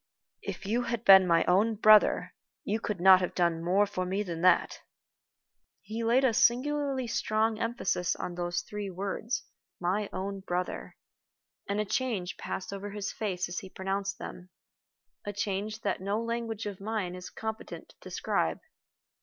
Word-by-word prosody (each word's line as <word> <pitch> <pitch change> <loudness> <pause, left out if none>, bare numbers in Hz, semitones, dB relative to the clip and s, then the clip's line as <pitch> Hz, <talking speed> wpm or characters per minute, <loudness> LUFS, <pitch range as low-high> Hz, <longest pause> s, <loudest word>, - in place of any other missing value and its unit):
"If 215 - -6
you 230 +5 +1
had 235 -1 -3
been 190 -1 +9
my 170 -1 +4
own 210 +5 +3
brother, 215 0 +5 0.3
you 215 +2 -1
could 210 -4 -3
not 190 +1 +8
have 180 - -2
done 170 -2 +1
more 190 +4 +3
for 190 -2 -3
me 190 +3 -1
than 170 -4 -5
that." 185 +1 +3 1.0
He 225 +2 -4
laid 240 +4 +3
a 245 - +3
singularly 270 +3 +2
strong 220 -1 0
emphasis 230 -7 0
on 180 - -5
those 175 0 -2
three 210 -1 -5
words 200 +6 -3 0.4
"my 195 +4 0
own 195 +1 -4
brother," 180 -1 -4 0.7
and 200 +1 0
a 210 - +1
change 210 -5 -2
passed 190 - -5
over 200 +1 -5
his 205 0 -4
face 190 -4 -2
as 175 - -4
he 190 - -10
pronounced 195 +1 -3
them 180 0 -9 0.7
a 205 - -4
change 205 +2 -3
that 200 -2 -1
no 200 +3 -1
language 230 -2 -3
of 200 -2 -6
mine 205 -4 -2
is 180 0 -8
competent 220 0 -6
to - - -19
describe. - - -1
200 Hz, 160 wpm, -29 LUFS, 185-220 Hz, 1.0 s, been